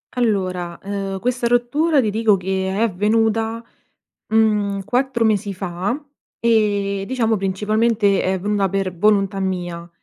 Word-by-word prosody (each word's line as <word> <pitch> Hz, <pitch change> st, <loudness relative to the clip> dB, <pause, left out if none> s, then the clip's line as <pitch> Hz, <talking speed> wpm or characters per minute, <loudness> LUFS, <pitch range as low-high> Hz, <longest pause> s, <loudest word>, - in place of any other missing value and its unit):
Allora, 185 Hz, -7 st, -1 dB
uhm, 195 Hz, -1 st, -3 dB
questa 245 Hz, +3 st, -1 dB
rottura 275 Hz, +6 st, +2 dB
ti 215 Hz, -5 st, +1 dB
dico 215 Hz, -2 st, +3 dB
che 190 Hz, +1 st, -2 dB
è 195 Hz, +3 st, -1 dB
avvenuta, 225 Hz, +2 st, +1 dB, 0.7 s
mhmm, 210 Hz, -3 st, +2 dB
4 250 Hz, 0 st, 0 dB
mesi 205 Hz, -2 st, +1 dB
fa; 190 Hz, -, -3 dB, 0.4 s
e, 205 Hz, -4 st, +1 dB
diciamo 230 Hz, -3 st, +1 dB
principalmente 205 Hz, +2 st, +1 dB
è 190 Hz, -, 0 dB
avvenuta 200 Hz, +1 st, 0 dB
per 190 Hz, -1 st, -2 dB
volontà 195 Hz, 0 st, +2 dB
mia, 175 Hz, -2 st, -3 dB
205 Hz, 125 wpm, -20 LUFS, 190-225 Hz, 0.7 s, dico